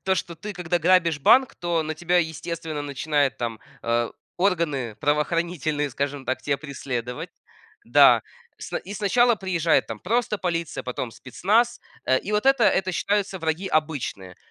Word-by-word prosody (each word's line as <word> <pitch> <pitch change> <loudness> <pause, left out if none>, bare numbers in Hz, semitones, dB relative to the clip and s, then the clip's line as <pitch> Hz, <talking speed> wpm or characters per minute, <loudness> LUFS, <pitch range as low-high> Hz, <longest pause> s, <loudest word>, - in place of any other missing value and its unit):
то, 190 0 +2
что 170 -1 -4
ты 210 +6 -6
когда 175 -1 -1
грабишь 170 -2 +3
банк, 260 - +5
то 170 -2 0
на 155 0 -4
тебя 175 +3 +1
естественно 160 -1 -3
начинают 145 -2 0
там, 115 -2 -3 0.2
э, 115 0 0 0.3
органы 165 - 0
правоохранительные, 150 -1 0
скажем 140 +1 -3
так, 130 0 -2
тя 140 -1 0
преследовать. 130 0 -5 0.5
Да. - - +6 0.4
Сна - - -4
и 200 - -9
сначала 235 +4 +3
приезжает 175 -5 +1
там - - -5
просто 220 +1 0
полиция, 170 -3 -2
потом 125 -1 -4
спецназ. 205 - 0 0.2
Э, 130 - +3
и 200 - -7
вот 210 +4 +1
это 270 0 +5
это 190 -1 +2
считаются 200 0 0
враги 165 +3 -2
обычные. 145 - -2
165 Hz, 155 wpm, -24 LUFS, 140-185 Hz, 0.5 s, Да